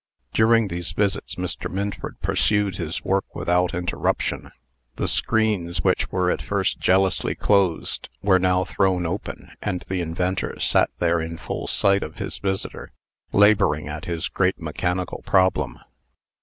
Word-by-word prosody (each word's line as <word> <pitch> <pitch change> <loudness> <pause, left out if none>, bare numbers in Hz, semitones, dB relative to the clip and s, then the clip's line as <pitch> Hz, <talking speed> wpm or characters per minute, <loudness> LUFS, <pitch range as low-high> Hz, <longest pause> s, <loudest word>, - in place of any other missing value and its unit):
During 110 -1 +4
these 85 -1 -4
visits, 100 +2 -1
Mr. 90 -1 -4
Minford 100 +2 -4
pursued 105 -3 +1
his 85 -2 -4
work 95 0 0
without 90 0 +1
interruption. 90 0 -1 0.4
The - - -1
screens, 105 -6 0
which - - +1
were 90 -1 +2
at - - -2
first 100 -2 -1
jealously 95 0 +2
closed, 95 -5 +1
were 95 -2 +5
now 90 0 +2
thrown 95 -2 +1
open, 90 +5 -5
and 90 - -3
the 95 -1 -1
inventor 90 +3 -2
sat - - +3
there 85 -1 +2
in 80 +1 -5
full - - -5
sight 100 0 +3
of 80 - -6
his - - -5
visitor, 95 -1 -4 0.4
laboring 100 -8 +4
at 75 +1 -6
his 85 -1 -2
great 95 0 0
mechanical 90 +3 -2
problem. 95 -1 +2
90 Hz, 140 wpm, -23 LUFS, 85-100 Hz, 0.4 s, were